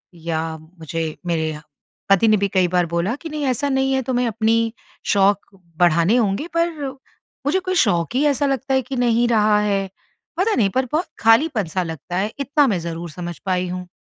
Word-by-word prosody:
या 160 -1 -3
मुझे 165 0 -6 0.2
मेरे 160 -2 -1 0.5
पति 195 +3 +5
ने 215 -1 +5
भी 200 - +1
कई 185 -2 +3
बार 180 0 +1
बोला 180 +8 0
कि 325 - -6
नहीं 300 -1 -4
ऐसा 270 +3 0
नहीं 265 0 +1
है 265 - +1
तुम्हे 250 0 0
अपनी 225 +1 +1 0.4
शौक 200 0 +3 0.3
बढ़ाने 175 +4 +4
होंगे 215 +6 0
पर 335 +1 +3 0.8
मुझे 300 +7 +2
कोई 370 0 -3
शौक 170 +6 0
ही 275 - +2
ऐसा 285 0 +1
लगता 270 -1 -1
है 265 - +3
कि 260 +2 -6
नहीं 240 -1 +2
रहा 215 -2 +3
है। 200 -2 0 0.5
पता 420 +4 +2
नहीं 205 -4 +3
पर 260 0 +2
बहुत 320 +4 0
खालीपन-सा 225 - +2
लगता 165 +1 -6
है 205 +3 0
इतना 280 +1 +2
मैं 195 -6 +1
ज़रूर 170 +1 -5
समझ 175 0 -6
पाई 185 -1 0
हूँ। 180 0 -5
210 Hz, 190 wpm, -21 LUFS, 175-265 Hz, 0.8 s, पति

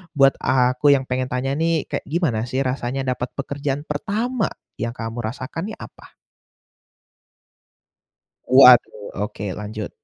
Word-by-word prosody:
buat 135 -1 +5
aku 130 +2 +2
yang 135 -1 +3
pengen 130 0 -2
tanya 125 +2 -1
nih 165 0 0
kayak - - -3
gimana 150 -9 0
sih 130 - -1
rasanya 130 +1 -2
dapat 125 0 -5
pekerjaan 140 +1 -3
pertama, 220 +2 -1 0.3
yang 115 0 -2
kamu 115 0 -5
rasakan 135 - -5
nih - - -9
apa? - - -13 2.3
Waduh, 125 -5 +6 0.2
oke 105 -2 -7
lanjut. 105 +1 -5
130 Hz, 125 wpm, -22 LUFS, 125-145 Hz, 2.3 s, Waduh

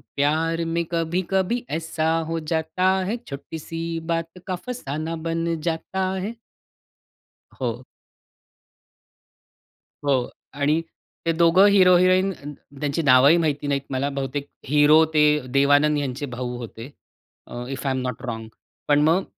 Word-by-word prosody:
प्यार 160 +4 +1
में 165 +1 -1
कभी 170 +2 0
कभी 195 +6 0
ऐसा 160 -1 -2 0.2
हो 165 0 -2
जाता 160 +3 0 0.2
है, 225 +5 -2
छोटी 140 +3 -7
सी 165 +1 -4
बात 165 +1 -2
का 185 - -1
फसाना 160 - -4
बन 165 0 -1 0.2
जाता 185 +3 -2
है. 220 - -3 1.3
हो. - - -2 2.2
हो, 130 -3 +1 0.3
आणि 145 +3 +1 0.5
ते 165 - +3
दोघं 170 +4 +6
हीरो-हिरोईन 185 0 +5
अ, 150 - -15 0.4
त्यांची 150 +3 -1
नावंही 135 +4 +6
माहिती 150 -3 -1
नाहीत 140 -1 0
मला 135 +1 -1
बहुतेक 140 +1 -3 0.2
हीरो 150 +3 +6
ते 150 - +5 0.3
देवानंद 145 +2 +4
यांचे 140 0 -3
भाऊ 125 -1 -5
होते, 120 +2 -8 0.6
अ, 120 0 -7
if 135 +1 -5
I 135 - +1
am 130 - -2
not 125 -2 -4
wrong 115 -1 -5 0.4
पण 145 0 +4
मग, 180 +4 +2
160 Hz, 135 wpm, -23 LUFS, 140-170 Hz, 2.2 s, दोघं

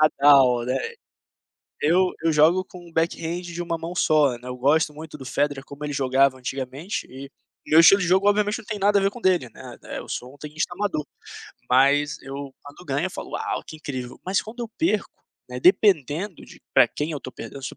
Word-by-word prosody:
Nadal", 140 -5 +5
né. 130 - 0 1.0
Eu 180 +4 +3
eu 165 - +4
jogo 160 +5 +4
com 180 - -13
o 165 - -18
backhand 165 +1 -1
de 175 0 -7
uma 170 -1 -2
mão 165 +2 -6
só, 155 -5 +3
né, 125 - -14
eu 125 - -5
gosto 150 +4 +2
muito 155 0 -9
do 135 - -9
Federer, 145 0 -1
como 140 +2 -9
ele 145 - -3
jogava 135 0 +2
antigamente 135 - -5
e 135 +2 -9 0.4
meu 160 +2 +6
estilo 195 +4 +7
de 180 - 0
jogo, 190 +3 +3
obviamente, 210 +1 +1
não 235 - -11
tem 210 -2 -4
nada 200 +1 +3
a - - 0
ver 195 - +2
com 245 - -11
dele, 180 - +2
né, - - -11
eh, - - -6
eu - - -9
sou 125 +1 -5
um - - -19
tenista 150 +3 -4
amador, 195 -6 -2 0.7
mas 145 +4 +3
eu, 135 0 -7
quando 145 +5 -13
ganho, 145 +6 -1
eu - - -6
falo: - - -8
"Uau, - - -3
que 155 - -10
incrível". 130 -5 -7
Mas 190 +2 +1
quando 230 +3 -10
eu 230 - -9
perco, 215 - -1 0.3
né, 125 0 -6
dependendo 180 - +2
de - - -16
pra - - +6
quem 150 +2 -4
eu 145 - -5
tô 130 - -8
perdendo, 140 - -9
se - - -3
eu - - -11
155 Hz, 220 wpm, -24 LUFS, 135-180 Hz, 1.0 s, estilo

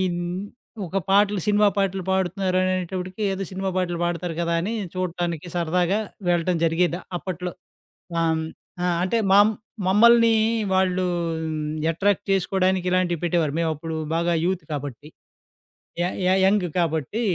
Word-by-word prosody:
హ్మ్, 175 +2 -3 0.4
ఒక 180 +3 -3
పాటలు 205 0 +4
సినిమా 210 0 +4
పాటలు 195 -1 0
పాడుతున్నారనేటప్పటికి, 185 0 -1
ఏదో 195 +1 -3
సినిమా 190 +1 -2
పాటలు 175 -2 -1
పాడతారు 175 -1 -2
కదా 170 0 0
అని, 210 +6 -2 0.2
చూడటానికి 175 -2 -3
సరదాగా 175 +4 +1 0.3
వెళ్లటం 175 0 +2
జరిగేది 170 +1 +2 0.2
అప్పట్లో. 180 0 -5 0.7
ఆహ్, 165 - +2
హ్మ్, 160 0 -1 0.4
ఆ! - - +1 0.2
అంటే 205 +5 +1
మామ్ 205 +2 +6 0.3
మమ్మల్ని 230 +3 +6 0.4
వాళ్ళూ 185 -1 +2 0.9
అట్రాక్ట్ 205 +4 +1
చేసుకోడానికి 190 -1 +1
ఇలాంటివి 180 -3 +1
పెట్టేవారు. 165 -4 +1
మేమప్పుడు 160 -1 -2 0.2
బాగా 170 0 +1
యూత్ 185 -2 -1
కాబట్టి. 145 0 -6 0.9
య - - +2 0.2
య 185 - +3
యంగ్ 195 -1 +3
కాబట్టి 160 - -1
180 Hz, 125 wpm, -24 LUFS, 170-195 Hz, 0.9 s, మామ్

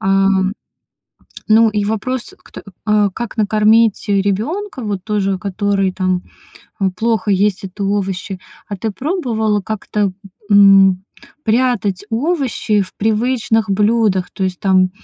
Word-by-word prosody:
А, 195 0 +2 1.2
ну 225 +1 +5
и 210 -1 -1
вопрос, 235 +4 -3
кт - - -13 0.3
э, 210 -2 +3
как 235 0 -5
накормить 215 +1 +3
ребенка, 220 - -1
вот 205 -4 -3
тоже, 195 -3 -1
который, 195 0 -1
там, 185 -1 -1 0.7
плохо 220 -1 0
есть 200 +1 +1
это 195 +1 -5
овощи. 195 -1 -2 0.3
А 205 - -4
ты 220 +4 -3
пробовала 230 - -1
как-то, 205 -1 -2 0.4
м, 195 -2 +6 0.4
прятать 220 -5 +1
овощи 245 - 0
в 185 - -10
привычных 225 0 0
блюдах? 210 -2 +1
То 195 - -5
есть, 185 -1 -3
там, 185 -1 +3
205 Hz, 120 wpm, -17 LUFS, 195-225 Hz, 1.2 s, м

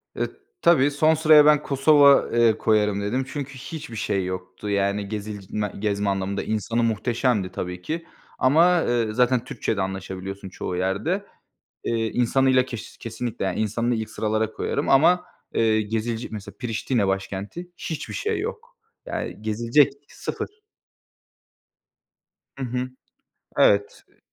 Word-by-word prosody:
E, - - -1 0.3
tabii. 145 -4 +5
Son 155 +2 +3
sıraya 155 -1 +7
ben 150 -1 +5
Kosova, 140 0 +6 0.2
ııı, 115 -2 +4
koyarım 105 -2 +2
dedim 125 +6 -1
çünkü 135 0 -5
hiçbir 150 -1 -7
şey 100 -3 -1
yoktu 90 +2 -6
yani 100 0 0
gezilc 105 -2 -6
ma 105 -1 0
gezme 100 0 -1
anlamında. 95 0 -1
İnsanı 115 +2 -1
muhteşemdi 115 -2 0
tabii 90 0 -5
ki. 165 - -4 0.3
Ama, 170 +7 +5
ııı, 115 -5 0
zaten 125 -1 +3
Türkçe'de 100 - -2
anlaşabiliyorsun 95 0 -5
çoğu 90 0 -5
yerde. 100 - -1 0.6
Iıı, 115 - 0
insanıyla 130 +1 +3
keş 120 -4 -8
kesinlikle 115 -1 -4
yani 95 0 -1
insanını 115 +3 0
ilk 110 -1 -3
sıralara 110 0 -1
koyarım - - -2
ama, 165 +6 +5 0.3
ııı, 110 -1 +3
gezile 110 +2 -2
mesela 105 -2 -8
Priştine 115 -2 0
başkenti 100 - -4
hiçbir 160 -3 -5
şey 435 +1 -1
yok. 465 +3 -6 0.3
Yani 110 - -5
gezilecek, 115 +7 +3 0.2
0. 425 +1 -6 1.9
Hı 135 - -5
hı. 125 +1 -3 0.7
Evet. 100 0 +3
Iıı - - -32
115 Hz, 135 wpm, -24 LUFS, 100-135 Hz, 1.9 s, sıraya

